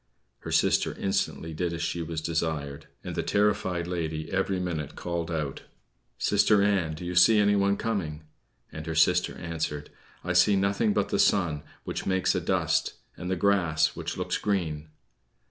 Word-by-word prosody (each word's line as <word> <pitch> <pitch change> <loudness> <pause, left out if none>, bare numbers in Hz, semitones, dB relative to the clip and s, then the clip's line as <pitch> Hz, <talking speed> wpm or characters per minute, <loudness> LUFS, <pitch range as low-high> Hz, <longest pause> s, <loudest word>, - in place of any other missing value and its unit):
Her - - -7
sister - - +2
instantly 80 -4 -2
did 85 +2 -2
as 85 0 -3
she 85 0 -2
was 80 -1 -4
desired, 80 -3 -3 0.2
and - - -5
the - - -1
terrified 100 -4 +1
lady 80 -3 -3
every 95 0 0
minute 85 -5 -3
called 85 -1 -3
out: 75 -5 -3 0.6
"Sister 105 -2 +3
Ann, 95 -6 +1
do 90 - -8
you 90 - -3
see 95 +5 +6
anyone 100 -1 +3
coming?" 85 -9 -3 0.5
And 80 0 -8
her 80 - -3
sister 90 +3 +3
answered: 80 -3 -4 0.3
"I 90 - -1
see 90 +4 +5
nothing 100 +2 +1
but 105 -1 0
the - - 0
sun, 80 -7 +2 0.2
which - - -5
makes 95 -1 +2
a - - -1
dust, - - +1 0.2
and 90 - -6
the 95 - +1
grass, 85 -5 +2
which - - -5
looks - - -2
green." 80 -7 -1
85 Hz, 165 wpm, -27 LUFS, 80-100 Hz, 0.6 s, see